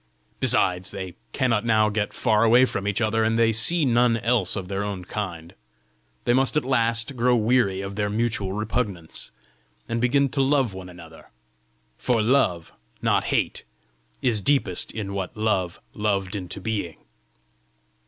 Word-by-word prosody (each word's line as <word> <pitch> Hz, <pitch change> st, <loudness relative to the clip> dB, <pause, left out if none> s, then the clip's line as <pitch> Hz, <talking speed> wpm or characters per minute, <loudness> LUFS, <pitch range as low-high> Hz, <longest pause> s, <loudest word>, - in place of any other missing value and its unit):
Besides, 90 Hz, 0 st, +2 dB
they 95 Hz, -2 st, -6 dB, 0.2 s
cannot 120 Hz, -5 st, +1 dB
now 110 Hz, -2 st, +3 dB
get 105 Hz, 0 st, -2 dB
far 110 Hz, -2 st, +2 dB
away 120 Hz, +3 st, +6 dB
from 100 Hz, -5 st, -4 dB
each 105 Hz, +2 st, -1 dB
other, 110 Hz, 0 st, +1 dB
and 110 Hz, +1 st, +1 dB
they 115 Hz, -1 st, +4 dB
see 140 Hz, +9 st, +3 dB
none 120 Hz, -2 st, +3 dB
else 115 Hz, -5 st, 0 dB
of 95 Hz, -3 st, -4 dB
their 100 Hz, +1 st, -2 dB
own 100 Hz, -3 st, -5 dB
kind: 85 Hz, -5 st, -5 dB, 0.7 s
they 120 Hz, -, +3 dB
must 135 Hz, +3 st, +2 dB
at 150 Hz, -, 0 dB
last 115 Hz, -1 st, +1 dB
grow 125 Hz, +1 st, +3 dB
weary 110 Hz, -4 st, +2 dB
of 100 Hz, 0 st, -6 dB
their 105 Hz, 0 st, -1 dB
mutual 110 Hz, -3 st, -1 dB
repugnance, 105 Hz, -5 st, -3 dB, 0.6 s
and 115 Hz, 0 st, -2 dB
begin 140 Hz, +3 st, +3 dB
to 135 Hz, -, -1 dB
love 135 Hz, -5 st, +2 dB
one 95 Hz, -1 st, -9 dB
another! 85 Hz, -2 st, -14 dB, 0.7 s
for 125 Hz, -3 st, +1 dB
love, 110 Hz, -8 st, +1 dB, 0.3 s
not -, -, +2 dB
hate, -, -, -1 dB, 0.6 s
is 115 Hz, -5 st, +2 dB
deepest 105 Hz, -7 st, +1 dB
in 100 Hz, -3 st, -5 dB
what 100 Hz, +2 st, -5 dB
Love 95 Hz, -5 st, -1 dB
'loved 100 Hz, -2 st, -1 dB
into 90 Hz, -3 st, -5 dB
being. 105 Hz, -8 st, -3 dB
110 Hz, 155 wpm, -24 LUFS, 95-120 Hz, 0.7 s, away